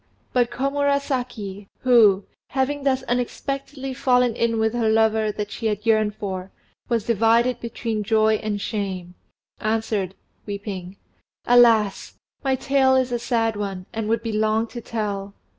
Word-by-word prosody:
But 245 -2 +3
Komurasaki 260 -7 -1
who, 220 -6 +5 0.2
having 275 +2 -1
thus 265 -2 +2
unexpectedly 270 +2 -3
fallen 250 -3 +2
in 230 -1 +1
with 220 0 +1
her 235 -2 +1
lover 220 -1 +3
that 205 0 -4
she 225 - -3
had 210 0 -2
yearned 215 -2 +2
for, 190 -2 -5 0.4
was 230 -3 0
divided 230 +2 +3
between 230 -2 -3
joy 220 +1 +3
and 210 -1 -3
shame 190 -5 -4 0.5
answered, 215 -3 -1 0.3
weeping 200 -2 -6 0.5
"Alas! 230 -4 +4 0.3
my 270 -1 +2
tale 265 0 +3
is 260 -1 +1
a 240 - 0
sad 230 -2 0
one, 195 -3 -4
and 220 -1 -3
would 230 0 +1
be 225 - -2
long 215 +1 +1
to 240 - -7
tell. 205 -3 -4
225 Hz, 140 wpm, -23 LUFS, 210-245 Hz, 0.5 s, who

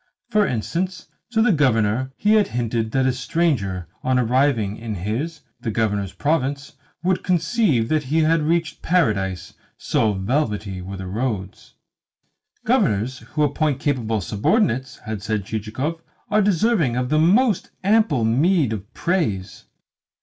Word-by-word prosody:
For 210 -2 +3
instance 170 - -3 0.2
to 225 -2 +2
the 240 - +4
Governor 130 - +2
he 210 +1 +3
had 215 -2 +4
hinted 115 -2 -2
that 130 +1 +1
a 130 - +2
stranger, 125 - -1
on 130 0 +1
arriving 120 -4 +1
in 115 -2 -5
his, 120 - -3 0.2
the - - -3
Governor's 105 -3 -1
province, 145 0 -1 0.3
would 185 0 +1
conceive 165 - +1
that 155 -2 +1
he 155 +5 +1
had 160 +1 +3
reached 165 0 -1
Paradise, 105 - 0 0.2
so 110 -2 +1
velvety 105 -2 -2
were 95 +2 -7
the 95 - -6
roads. 100 -1 -4 0.9
"Governors 115 +6 +1
who 150 - -2
appoint 145 -1 0
capable 115 -7 -1
subordinates," 125 - 0
had 110 -2 -4
said 105 -2 -2
Chichikov, 115 +11 -3 0.3
"are 215 +1 +4
deserving 195 - +2
of 125 0 -1
the 155 +1 +3
most 205 +6 +3
ample 195 - +3
meed 140 - +2
of 105 -1 -7
praise." 110 - -1
130 Hz, 140 wpm, -22 LUFS, 110-165 Hz, 0.9 s, the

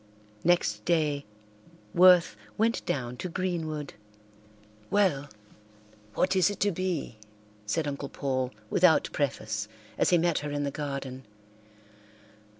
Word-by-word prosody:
Next 105 -12 +2
day 150 -3 +1 0.7
Worth 180 -7 +6 0.2
went 225 +2 +1
down 125 -2 -2
to 180 - -4
Greenwood. 160 -5 -3 1.0
"Well, 180 -9 +2 0.9
what 190 - +2
is 185 +1 +4
it 205 - -5
to 205 +1 +3
be?" 170 - -3 0.5
said 150 +8 0
Uncle 140 -1 -4
Paul 130 -2 -1 0.2
without 175 -3 +4
preface, 110 -7 -2 0.3
as - - +3
he 175 - +5
met 170 -1 +2
her 150 - -5
in 145 0 -2
the 140 - -1
garden. 135 -3 -5
150 Hz, 120 wpm, -28 LUFS, 135-180 Hz, 1.0 s, Worth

